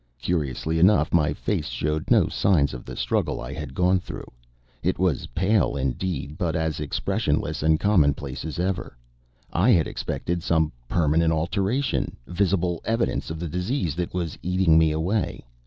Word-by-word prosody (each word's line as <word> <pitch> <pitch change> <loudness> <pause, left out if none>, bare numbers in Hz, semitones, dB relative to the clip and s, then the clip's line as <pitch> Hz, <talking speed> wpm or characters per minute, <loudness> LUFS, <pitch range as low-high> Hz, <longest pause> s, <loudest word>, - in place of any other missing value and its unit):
Curiously 80 0 -1
enough 90 -3 +4
my 75 -4 +3
face - - -2
showed 75 +6 -2
no - - +5
signs 80 -8 +2
of - - -8
the - - -7
struggle - - -1
I - - -6
had 75 -3 -7
gone 90 +1 +3
through. - - -8 0.6
It - - 0
was 90 -6 0
pale 100 +1 +2
indeed, 70 +2 -3
but 85 -3 0
as 80 -1 -1
expression 75 -2 0
less - - -4
and 80 +1 +3
commonplace 70 -9 +1
as 80 -2 -5
ever. 90 -8 -2 0.6
I 95 +8 +3
had 85 -10 +5
expected 85 0 -3
some 80 -2 +1 0.2
permanent 80 0 +2
alteration 100 - 0
visible 90 -2 0
evidence 115 +1 -1
of 80 0 -5
the 85 - -3
disease 90 - -1
that 90 -1 -2
was 85 -4 -3
eating 90 -2 +3
me 80 0 +5
away. 85 - -1
85 Hz, 160 wpm, -25 LUFS, 75-90 Hz, 0.6 s, no